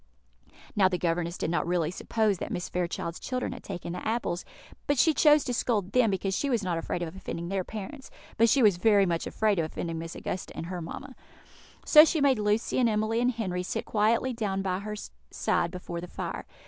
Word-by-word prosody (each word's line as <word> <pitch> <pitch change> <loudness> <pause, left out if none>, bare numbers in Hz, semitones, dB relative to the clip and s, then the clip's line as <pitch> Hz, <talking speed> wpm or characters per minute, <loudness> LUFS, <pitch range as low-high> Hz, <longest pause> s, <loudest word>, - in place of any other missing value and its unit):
Now 195 -2 +5
the 185 -1 -1
governess 170 0 -1
did - - -2
not 170 - 0
really 170 -2 +1
suppose 210 0 0
that - - -5
Mrs. 175 - -4
Fairchild's 170 -1 -3
children 255 -1 -3
had 245 - -10
taken 175 -3 -5
the 180 - -4
apples; 220 -6 -1 0.4
but 285 - +2
she 320 +5 +5
chose 300 -1 +5
to 250 - -2
scold 210 -5 0
them 250 -2 +4
because 195 0 -1
she 280 - -1
was 235 -5 +1
not 175 -3 -1
afraid 175 +1 -3
of 165 +1 -6
offending 170 -2 -5
their 195 -1 -1
parents, 255 +9 -8 0.3
but 230 +1 +4
she 270 0 +4
was 205 -5 +5
very 200 +1 +4
much 170 -2 -1
afraid 215 -4 +1
of 165 - +1
offending 165 +1 -4
Miss 165 0 -6
Augusta 185 - -5
and - - -4
her 180 0 -5
mamma. 260 +11 -7 0.7
So 305 -1 +9
she 325 0 +1
made 275 -4 +3
Lucy 210 +4 +1
and 240 -2 +4
Emily 215 +2 0
and 245 - +3
Henry 200 -7 -2
sit 180 - -3
quietly 225 +4 +1
down 200 -4 -2
by 185 -1 -1
her 210 +1 -5 0.3
side 170 - 0
before 175 -1 -6
the 180 - -7
fire. - - -5
195 Hz, 215 wpm, -28 LUFS, 175-230 Hz, 0.7 s, So